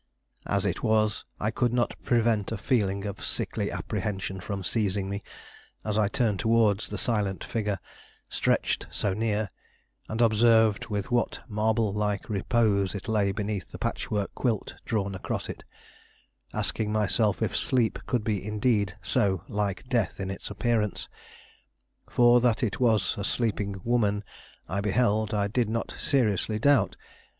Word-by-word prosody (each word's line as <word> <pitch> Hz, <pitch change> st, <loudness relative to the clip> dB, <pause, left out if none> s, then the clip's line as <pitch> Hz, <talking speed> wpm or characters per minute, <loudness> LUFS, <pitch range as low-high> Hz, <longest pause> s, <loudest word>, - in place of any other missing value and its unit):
As -, -, +1 dB
it -, -, -1 dB
was, 110 Hz, -1 st, +2 dB
I 105 Hz, -, 0 dB
could 120 Hz, 0 st, +1 dB
not 120 Hz, -1 st, +1 dB
prevent 115 Hz, -4 st, +2 dB
a 110 Hz, -, -2 dB
feeling 100 Hz, -4 st, 0 dB
of 100 Hz, -1 st, -5 dB
sickly -, -, -2 dB
apprehension 95 Hz, -2 st, -3 dB
from 95 Hz, +1 st, -4 dB
seizing 100 Hz, -2 st, 0 dB
me 100 Hz, 0 st, -3 dB, 0.6 s
as 105 Hz, -1 st, -1 dB
I 105 Hz, -1 st, +3 dB
turned 110 Hz, -4 st, +1 dB
towards 110 Hz, -2 st, +3 dB
the 105 Hz, -, -5 dB
silent 100 Hz, -2 st, -1 dB
figure 105 Hz, -4 st, -1 dB, 0.5 s
stretched -, -, 0 dB
so 100 Hz, -, -1 dB
near, 105 Hz, -1 st, 0 dB, 0.6 s
and 110 Hz, -, -3 dB
observed 110 Hz, -2 st, +4 dB
with 105 Hz, +1 st, -3 dB
what 120 Hz, -2 st, +1 dB
marble 110 Hz, -1 st, +1 dB
like 105 Hz, 0 st, -1 dB
repose 100 Hz, -2 st, +2 dB
it 100 Hz, -, -6 dB
lay 105 Hz, -3 st, +2 dB
beneath 100 Hz, -1 st, -3 dB
the -, -, -8 dB
patchwork 105 Hz, -2 st, -2 dB
quilt 115 Hz, -5 st, -1 dB
drawn 100 Hz, -3 st, -1 dB
across 95 Hz, -, -4 dB
it, -, -, -7 dB, 0.9 s
asking 105 Hz, -1 st, -1 dB
myself 110 Hz, +1 st, +1 dB
if 105 Hz, -, -1 dB
sleep 120 Hz, -5 st, +1 dB
could 120 Hz, -4 st, 0 dB
be 105 Hz, -4 st, -1 dB
indeed 105 Hz, -2 st, +1 dB
so 95 Hz, -4 st, +1 dB
like 105 Hz, -3 st, -2 dB
death 120 Hz, -9 st, 0 dB
in 95 Hz, -1 st, -2 dB
its 95 Hz, -, -6 dB
appearance. 105 Hz, 0 st, 0 dB, 1.0 s
For 120 Hz, 0 st, +6 dB
that 120 Hz, 0 st, +2 dB
it 105 Hz, -4 st, -1 dB
was 110 Hz, -6 st, +3 dB
a -, -, -2 dB
sleeping 100 Hz, -3 st, -1 dB
woman 105 Hz, -4 st, +1 dB, 0.4 s
I 95 Hz, +5 st, -1 dB
beheld, 110 Hz, +1 st, +1 dB
I 100 Hz, -1 st, +1 dB
did 115 Hz, +1 st, 0 dB
not 115 Hz, +1 st, -2 dB
seriously 110 Hz, -5 st, +1 dB
doubt. 120 Hz, -4 st, +3 dB
105 Hz, 150 wpm, -27 LUFS, 100-115 Hz, 1.0 s, For